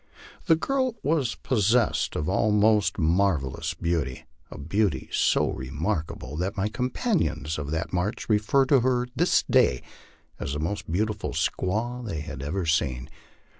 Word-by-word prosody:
The 165 - +6
girl 260 +7 0
was 145 -7 +1
possessed 115 -1 +1
of 75 - -2
almost 105 +2 +3
marvel 85 -5 +2
lous - - -4
beauty, 80 -7 -2 0.2
a - - -9
beauty 95 +5 -1
so - - +2
remarkable 75 +1 -3
that 95 +5 -2
my 100 +2 0
companions 105 - -1
of 70 -1 -5
that 80 +4 -3
march 90 +5 -2
refer 110 +5 +3
to 135 0 +4
her 125 0 +1
to 125 - -19
this 175 +5 +3
day 65 - +3 0.6
as 70 - -3
the 75 - -3
most 85 +2 -3
beautiful 105 +3 -1
squaw 120 +6 -1
they 85 -10 -4
have 75 -3 -7
ever 85 +6 -2
seen. 65 -5 0
100 Hz, 150 wpm, -26 LUFS, 75-120 Hz, 0.6 s, The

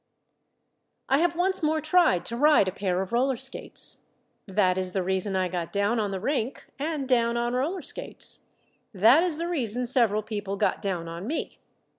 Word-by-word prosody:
I 270 - +4
have 345 0 +1
once 375 +2 0
more 310 0 +1
tried 310 - +3
to 235 - -3
ride 295 -5 +4
a - - 0
pair 190 -1 -1
of 190 - -10
roller 260 +2 +2
skates. - - 0 0.4
That 190 -2 +2
is 185 -1 -3
the 190 - 0
reason 190 +1 -1
I 185 -1 +1
got 175 -2 -4
down 205 +3 +1
on 210 -2 0
the 195 -1 -3
rink 260 +2 -2
and 295 -2 -2
down 235 -2 +2
on 240 0 -1
roller 310 +9 -1
skates. - - -5 0.6
That 230 - +6
is 345 -4 0
the 335 +1 -2
reason 250 -8 -1
several 230 -4 +2
people 205 -2 -4
got - - 0
down 180 -4 -3
on 170 +4 -6
me. 310 - -4
230 Hz, 185 wpm, -26 LUFS, 190-295 Hz, 0.6 s, That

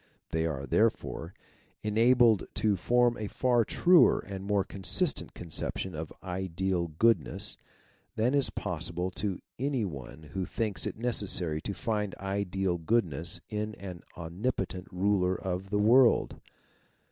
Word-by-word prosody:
They 80 0 0
are, 70 -4 -3
therefore, 80 +5 0 0.5
enabled 115 +1 +4
to 105 -2 +2
form 120 +5 +2
a 105 - -3
far 120 +1 +2
truer 175 - +5
and 95 -1 -7
more 100 -1 +1
consistent 135 - 0
conception 90 +2 -4
of 80 0 -6
Ideal 95 -1 -2
Goodness, 110 +9 +1 0.6
than 120 +5 +1
is 140 -2 +2
possible 85 +2 -3
to 95 0 -3 0.2
any 135 -4 0
one 75 -2 -8
who 95 - -1
thinks 110 +1 -2
it - - -5
necessary 95 -9 +3
to 100 - -4
find 105 -4 -2
ideal 95 -2 -2
goodness 85 -4 0
in 105 0 -3
an 90 -3 -8
omni 90 +8 -3
potent 90 -4 -5
ruler 95 0 +1
of 95 +1 -4
the 105 - 0
world. 115 +4 +4
95 Hz, 135 wpm, -29 LUFS, 90-110 Hz, 0.6 s, truer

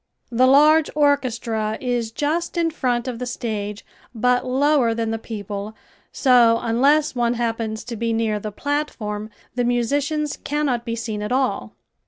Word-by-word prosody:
The 250 +2 +4
large 300 +3 +5
orchestra 235 -7 +1
is 245 -3 -1
just 310 +9 -2
in 335 -1 +1
front 250 -5 -1
of 245 -2 -4
the 250 - -4
stage 210 -4 -4 0.3
but 250 +2 +2
lower 265 -2 +2
than 225 -1 -1
the 225 - -2
people, 210 -1 -6 0.4
so 240 -4 +5
unless 280 +7 +3
one 240 -1 +1
happens 225 -2 -2
to 240 - -6
be 230 +1 -1
near 225 -2 0
the 215 +1 -5
platform 215 -6 -3 0.2
the 245 - 0
musicians 280 +5 0
cannot 280 -5 -1
be 230 -1 -2
seen 220 -2 -4
at 210 - -4
all. 225 - -1
240 Hz, 155 wpm, -22 LUFS, 225-280 Hz, 0.4 s, large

